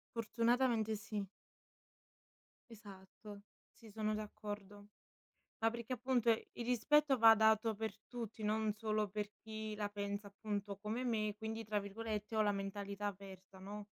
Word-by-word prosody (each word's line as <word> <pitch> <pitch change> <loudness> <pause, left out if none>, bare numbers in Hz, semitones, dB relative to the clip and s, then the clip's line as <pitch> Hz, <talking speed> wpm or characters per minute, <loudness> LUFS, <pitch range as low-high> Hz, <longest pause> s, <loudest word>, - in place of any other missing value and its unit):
Fortunatamente 230 -1 +2
sì. 205 -1 -3 1.5
Esatto. 200 0 -11 0.3
Sì, 225 -3 -14
sono 215 0 0
d'accordo. 205 -1 -6 0.8
Ma 225 - +5
perché 235 +2 -3
appunto 245 -2 +2
il 230 +1 -1
rispetto 275 +3 +4
va 225 0 +10
dato 220 0 +4
per 220 -1 -3
tutti, 230 -3 -6
non 215 0 +1
solo 215 -1 0
per 210 +1 -3
chi 220 -1 -5
la 205 -1 -2
pensa 205 0 -3
appunto 205 -1 -3
come 220 +5 -2
me, 215 -3 0
quindi 220 +1 -4
tra 210 -1 0
virgolette 215 +1 -4
ho 215 - +5
la 205 -1 +3
mentalità 200 +1 -3
"aperta", 190 -1 -7
no? 205 +2 -7
215 Hz, 135 wpm, -38 LUFS, 205-225 Hz, 1.5 s, va